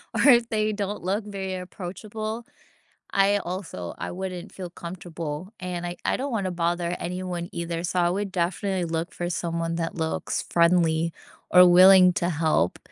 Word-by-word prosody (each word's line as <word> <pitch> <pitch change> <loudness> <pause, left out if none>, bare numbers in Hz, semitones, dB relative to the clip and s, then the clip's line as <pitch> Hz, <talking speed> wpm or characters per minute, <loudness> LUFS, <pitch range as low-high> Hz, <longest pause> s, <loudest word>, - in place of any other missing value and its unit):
or - - +1
if 240 -3 +6
they 215 -1 0
don't 205 -2 -3
look 200 +4 0
very 195 -2 -4
approachable, 215 +5 -6 0.7
I 200 +1 +4
also 175 - -5
I - - -4
wouldn't 185 0 -6
feel 180 -2 -7
comfortable, 170 0 -6
and 175 -1 -4
I 175 - -5
I - - +1
don't 275 0 -3
wanna 195 -4 -1
bother 175 0 -1
anyone 180 -1 -4
either, 170 0 -3
so 180 +1 0
I 175 - +3
would 195 +1 -2
definitely 185 +1 -1
look 165 +1 -3
for 175 0 -3
someone 165 -1 -2
that 165 -1 -2
looks 160 -1 -2
friendly 170 -1 +3 0.4
or 180 0 +9
willing 185 0 +8
to 175 - 0
help. 155 - +1
180 Hz, 165 wpm, -25 LUFS, 170-195 Hz, 0.7 s, or